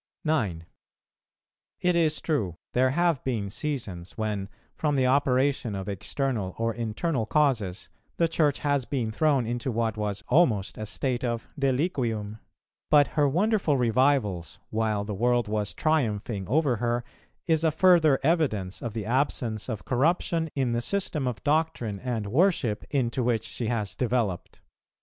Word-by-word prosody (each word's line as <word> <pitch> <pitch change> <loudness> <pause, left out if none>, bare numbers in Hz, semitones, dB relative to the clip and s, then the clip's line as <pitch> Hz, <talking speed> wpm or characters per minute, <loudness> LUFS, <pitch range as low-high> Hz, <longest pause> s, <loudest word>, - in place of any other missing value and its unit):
9. 105 - 0 1.2
It 180 -1 +2
is 160 -3 +2
true, 110 - -1 0.2
there 130 +1 +3
have 170 0 +1
been 110 -7 -2
seasons 105 - -4
when, 105 -3 -2 0.2
from 150 -2 0
the 130 -2 +2
operation 130 -3 +2
of 95 -1 -5
external 105 0 -2
or 115 0 0
internal 115 +3 -2
causes, 110 -10 +1 0.3
the 170 - +3
Church 150 -7 +1
has 145 -2 +1
been 120 -3 -2
thrown 140 0 +2
into 120 +3 -2
what 115 -1 -1
was 105 -1 -3
almost 115 - +2
a 110 - -4
state 125 +3 -2
of 120 -2 -2
deliquium; 125 - -1 0.5
but 145 -2 +5
her 145 -2 +2
wonderful 180 -2 +2
revivals, 120 -7 +1
while 110 -2 0
the 105 0 -4
world 120 +3 +1
was 105 -1 -1
triumphing 110 - 0
over 140 -1 +2
her, 120 +1 -1 0.4
is 160 -1 +2
a 160 - +4
further 160 -3 +4
evidence 130 - 0
of 120 -3 -4
the 110 -2 -4
absence 115 -4 -1
of 110 - -5
corruption 160 +4 +1
in 130 -4 0
the 120 0 0
system 160 -4 -1
of 125 -3 -4
doctrine 145 -9 0
and 120 -3 -3
worship 130 - +1
into 130 -3 0
which 115 -2 +1
she 115 - -4
has 110 -4 -2
developed. 115 -7 -2
125 Hz, 150 wpm, -27 LUFS, 110-145 Hz, 1.2 s, but